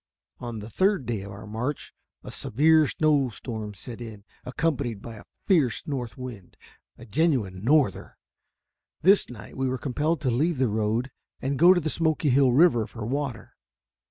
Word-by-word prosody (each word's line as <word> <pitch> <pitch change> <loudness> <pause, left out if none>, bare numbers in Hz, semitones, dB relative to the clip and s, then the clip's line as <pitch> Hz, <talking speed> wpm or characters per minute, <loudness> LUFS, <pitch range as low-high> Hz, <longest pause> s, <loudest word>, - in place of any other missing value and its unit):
On 120 -2 -6
the 105 +1 -8
third 190 - +1
day 110 -3 -2
of 100 +1 -8
our 100 +2 -10
march, 120 +7 -4 0.3
a - - -8
severe 155 +5 +3
snow 145 -4 +2
storm 110 -2 -7
set 120 +4 -9
in, 110 -4 -9 0.2
accompanied 130 -4 -2
by 115 +1 -9
a - - -13 0.2
fierce 155 - +2
north 125 -6 -4
wind 125 -8 -9 0.4
a 115 - -12
genuine 115 - 0
"norther." 135 - +1 0.9
This 195 +4 +5
night 115 -4 -11
we 130 0 -1
were 130 - -2
compelled 150 +5 -1
to 130 -4 +1
leave 155 +7 +1
the 130 -2 +2
road 110 +4 -1 0.3
and 135 +1 -2
go 175 +3 +8
to - - +2
the 160 - -3
Smoky 160 -2 +1
Hill 135 0 +4
River 120 -5 +4
for 110 -3 -7
water. 130 -2 -4
125 Hz, 170 wpm, -26 LUFS, 110-150 Hz, 0.9 s, go